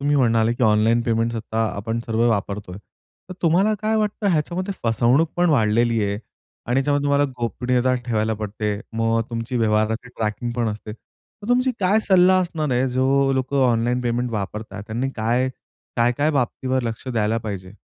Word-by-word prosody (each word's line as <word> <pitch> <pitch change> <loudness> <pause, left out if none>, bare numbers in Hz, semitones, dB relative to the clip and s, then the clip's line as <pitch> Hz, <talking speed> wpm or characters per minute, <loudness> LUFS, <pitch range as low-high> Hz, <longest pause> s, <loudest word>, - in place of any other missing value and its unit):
तुम्ही 145 +1 +1
म्हणाले 115 -3 +3
की 125 - -4
ऑनलाईन 110 +2 +3
पेमेंट्स 115 0 0
आत्ता 110 0 -2
आपण 115 +3 -3
सर्व 115 +1 +1
वापरतोय. 100 -3 -2 0.5
तर 185 - -7
तुम्हाला 185 +6 +3
काय 220 +1 +1
वाटतं 210 0 -1
ह्याच्यामध्ये 175 +5 -1
फसवणूक 120 +8 +3
पण 175 0 +3
वाढलेली 115 -3 +2
आहे 100 - -1 0.5
आणि 120 - 0
ह्याच्यामध्ये 145 +1 +1
तुम्हाला 145 0 +3
गोपनीयता 125 +2 0
ठेवायला 110 -1 0
पडते, 105 0 -3 0.2
मग 115 0 +1
तुमची 115 +2 -3
व्यवहाराची 110 +2 +1
ट्रॅकिंग 115 +1 -3
पण 115 -2 +1
असते. 105 0 -6
मग 205 - -15
तुमची 255 +1 +3
काय 195 +4 +3
सल्ला 185 0 +6
असणार 155 -5 -2
आहे 130 +2 +1
जो 135 +2 +2
लोकं 135 +1 0
ऑनलाईन 120 +2 +1
पेमेंट 120 0 -1
वापरतात 105 0 -5
त्यांनी 120 +4 -2
काय, 120 +4 +1 0.5
काय-काय 120 +6 +2
बाबतीवर 130 -1 -1
लक्ष 115 +2 -5
द्यायला 115 -2 0
पाहिजे? 100 -4 -6
120 Hz, 160 wpm, -22 LUFS, 110-140 Hz, 0.5 s, सल्ला